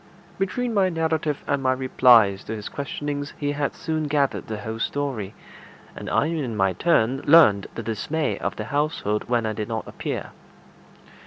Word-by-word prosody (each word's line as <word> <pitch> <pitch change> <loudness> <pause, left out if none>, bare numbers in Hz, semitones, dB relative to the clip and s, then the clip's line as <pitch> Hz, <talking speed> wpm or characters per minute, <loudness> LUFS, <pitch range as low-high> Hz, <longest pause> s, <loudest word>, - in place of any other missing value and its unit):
Between 230 +5 -1
my 195 -3 +3
narrative 160 -3 -1
and 140 -1 0
my 130 -1 +2
replies 120 -6 +4
to 110 - -4
his 105 -1 -6
questionings 145 0 -4
he 145 -1 -1
had 145 -1 -2
soon 155 -1 -2
gathered 145 -2 0
the 110 - -4
whole 110 +2 -6
story, 125 -8 -3 0.6
and - - -7
I - - +2
in 150 -9 -2
my 95 -1 +2
turn 135 - +2
learned 110 -12 +6
the 115 - -5
dismay 140 +8 -2
of - - -3
the 105 - -5
household 135 -6 -1
when 120 -2 +1
I 110 - -1
did 105 0 -4
not 110 -2 -4
appear. - - -5
135 Hz, 170 wpm, -24 LUFS, 110-150 Hz, 0.6 s, learned